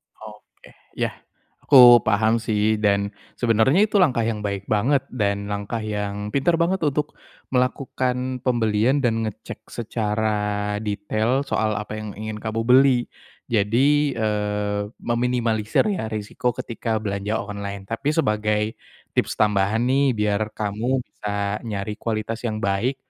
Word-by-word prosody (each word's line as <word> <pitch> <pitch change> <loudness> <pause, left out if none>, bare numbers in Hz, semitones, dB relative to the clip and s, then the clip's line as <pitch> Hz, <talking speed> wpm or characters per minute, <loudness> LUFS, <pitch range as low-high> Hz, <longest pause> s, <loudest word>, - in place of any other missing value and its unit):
Oke, - - -15 0.2
iya. - - -1 0.6
Aku 125 -3 +9
paham, 110 +1 +2
sih, 110 -1 +1
dan 100 -1 +1 0.2
sebenernya 120 - +3
itu 210 -1 +2
langkah 130 -10 +3
yang 110 -1 -1
baik 100 -1 -4
banget, 130 +6 +2
dan 100 -3 -1
langkah 105 +3 -3
yang 105 -1 -3
pinter 140 +5 +2
banget 170 +3 +1
untuk 150 -1 -1 0.4
melakukan 125 0 -1
pembelian, 120 +2 +1
dan 115 -2 +1
ngecek 110 - -9
secara 110 -2 -2 0.5
detail 110 +5 -1
soal 110 -5 0
apa 105 +1 -5
yang 105 -1 -7
ingin 110 +1 -6
kamu 110 +1 -2
beli. 130 +1 +5 0.5
Jadi, 135 +7 +2
eee, 105 -2 -1 0.2
meminimalisir, 120 -2 +1
ya, 170 - -2
resiko 110 +2 -3
ketika 115 -3 -3
belanja 100 +1 -2
online. 100 -1 -6
Tapi, 125 +9 -2
sebagai 105 -7 +1 0.5
tips - - 0
tambahan 105 +1 +2
nih, 135 -2 +3
biar 105 -1 0
kamu 115 +5 -1
bisa 100 -1 -3
nyari 105 0 -4
kualitas 110 0 -3
yang 110 0 -4
baik 100 +7 0
110 Hz, 130 wpm, -23 LUFS, 105-125 Hz, 0.6 s, Aku